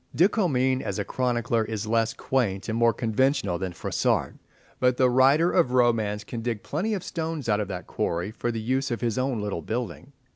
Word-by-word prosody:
De 175 - +6
Comines, 130 - +1
as - - -3
a - - -2
chronicler, 120 -2 0
is 110 0 -4
less 115 +1 +1
quaint 100 -7 -1
and 110 - -2
more 115 0 +4
conventional 115 -3 0
than 95 -1 -3
Froissart, 85 - 0 0.5
but 125 -1 +2
the 130 -1 +4
writer 140 +7 +4
of 150 -9 +2
romance 110 -4 +2
can 115 +2 -6
dig 115 -3 -3
plenty 210 +9 -1
of 185 - -5
stones 160 -5 -4
out 105 -2 +2
of 105 - -2
that 95 -2 -6
quarry 85 +4 -2
for 120 +2 -3
the 115 - -3
use 130 +5 -1
of 120 - -3
his 120 -1 0
own 130 -3 0
little 105 -5 -3
building. 120 +4 -5
120 Hz, 205 wpm, -26 LUFS, 110-130 Hz, 0.5 s, De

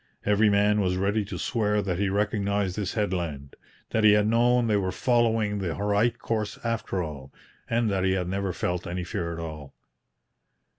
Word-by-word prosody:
Every 105 +1 +4
man 105 +1 +3
was 90 -1 +1
ready 100 +3 +1
to 105 - -6
swear 105 -3 0
that 90 -2 -2
he 100 -1 +1
recognized 100 -1 0
this 105 -2 -3
headland, 85 -10 -3 0.4
that 110 - +1
he 105 -1 +7
had 105 0 +4
known 120 +2 +3
they 110 -2 +2
were 95 -2 0
following 115 -4 +1
the 90 -4 -2
right 105 +3 +1
course 110 -2 -3
after 115 -5 -2
all, 70 -4 -8 0.4
and 115 0 +1
that 95 -1 0
he 95 0 +2
had 90 -2 -1
never 95 +1 -2
felt 90 0 -3
any 90 +1 -3
fear 85 0 -3
at 85 - -5
all. 80 -4 -7
100 Hz, 185 wpm, -26 LUFS, 90-105 Hz, 0.4 s, he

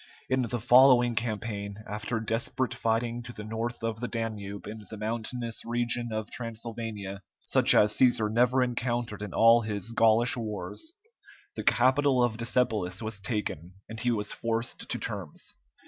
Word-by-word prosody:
In 130 0 +2
the 120 0 -1
following 125 +1 +6
campaign, 105 -3 -3
after 105 +3 -3
desperate 115 +3 -1
fighting 115 +1 -1
to 120 - -8
the 105 - -8
north 115 +2 -4
of 115 -1 -2
the 125 - -2
Danube 105 -4 -4
in 110 +1 -8
the 110 - -7
mountainous 115 +2 -3
region 120 0 -1
of 110 -1 -4
Transylvania, 115 -4 -5 0.2
such - - +5
as 105 0 +5
Cæsar 115 -4 +3
never 125 +2 +4
encountered 120 -3 -2
in 105 -2 -5
all 115 +4 +6
his 105 0 -3
Gaulish 115 +1 +4
wars, 120 - -5 0.6
the - - -4
capital 130 +1 +4
of 115 -2 0
Decebalus 110 -5 0
was 110 -1 -4
taken, 95 -5 -3
and 115 0 -7
he 125 - +1
was 105 -3 -1
forced 115 +1 -3
to - - 0
terms. - - -6
115 Hz, 155 wpm, -28 LUFS, 105-120 Hz, 0.6 s, following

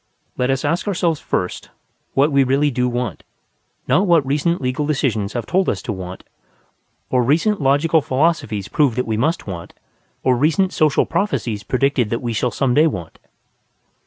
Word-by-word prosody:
Let 125 0 0
us 135 +2 0
ask 170 +7 -1
ourselves 170 -5 0
first 90 - -3 0.5
what 145 +3 +3
we 140 -1 +4
really 140 +3 +2
do 125 0 0
want, 120 -6 -3 0.7
not 195 +2 +3
what 165 -5 +4
recent 150 +5 0
legal 135 +3 -2
decisions 115 -9 -1
have 120 -3 -3
told 190 +7 +1
us 95 - -1
to 110 - -3
want, 95 -1 -8 0.9
or 125 - +3
recent 160 - +1
logical 145 +4 +3
philosophies 130 - 0
proved 140 -6 +1
that 125 - -1
we 110 - -1
must 155 +10 0
want, 85 -4 -7 0.5
or 130 -1 +3
recent 165 +8 +1
social 155 -3 +2
prophecies 120 - -1
predicted 130 0 0
that 115 +3 -3
we 120 -1 -2
shall 125 +3 0
some 125 +1 0
day 155 +5 +5
want. 90 - -6
135 Hz, 170 wpm, -20 LUFS, 120-155 Hz, 0.9 s, day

